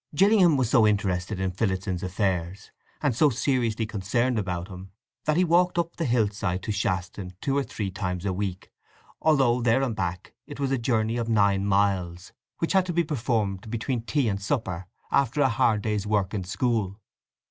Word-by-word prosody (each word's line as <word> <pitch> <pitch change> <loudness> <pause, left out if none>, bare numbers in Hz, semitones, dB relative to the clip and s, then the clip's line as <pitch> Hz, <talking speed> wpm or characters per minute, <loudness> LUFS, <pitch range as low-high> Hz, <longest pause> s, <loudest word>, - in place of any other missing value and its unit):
Gillingham 190 -3 +5
was 130 -3 +1
so 115 -6 +5
interested 95 -1 0
in 95 -1 -1
Phillotson's 95 -2 -2
affairs, 95 0 -2 0.3
and 140 -6 +2
so 150 +4 +4
seriously 115 -3 0
concerned 110 +4 0
about 90 -3 -3
him, 95 -1 -10 0.4
that 155 +1 +2
he 180 - +4
walked 180 +1 +3
up 170 0 -1
the 165 - -2
hill 120 -4 +2
side 95 -3 -3
to 110 - -2
Shaston 95 -2 -2
two 135 +3 -1
or 140 - +2
three 105 -7 -4
times 90 -1 -3
a 95 - 0
week, 95 -1 -4 0.5
although, 135 -6 +3
there 120 +3 +3
and 120 -5 -1
back, 90 -3 -4
it - - -9
was 135 -1 -1
a 135 - +1
journey 115 -1 0
of 115 -1 -2
nine 100 -3 +2
miles, 95 -3 0 0.2
which 165 - -1
had 190 -1 +3
to 175 - -2
be 170 +1 +2
performed 110 - -2
between 120 +2 -2
tea 130 +2 0
and 100 -2 -1
supper, 95 -6 -2 0.2
after 140 +1 +2
a 135 -2 +4
hard 110 -2 +2
day's 105 -2 -1
work 105 -2 0
in 95 -3 -3
school. 105 0 -1
110 Hz, 190 wpm, -26 LUFS, 95-130 Hz, 0.5 s, Gillingham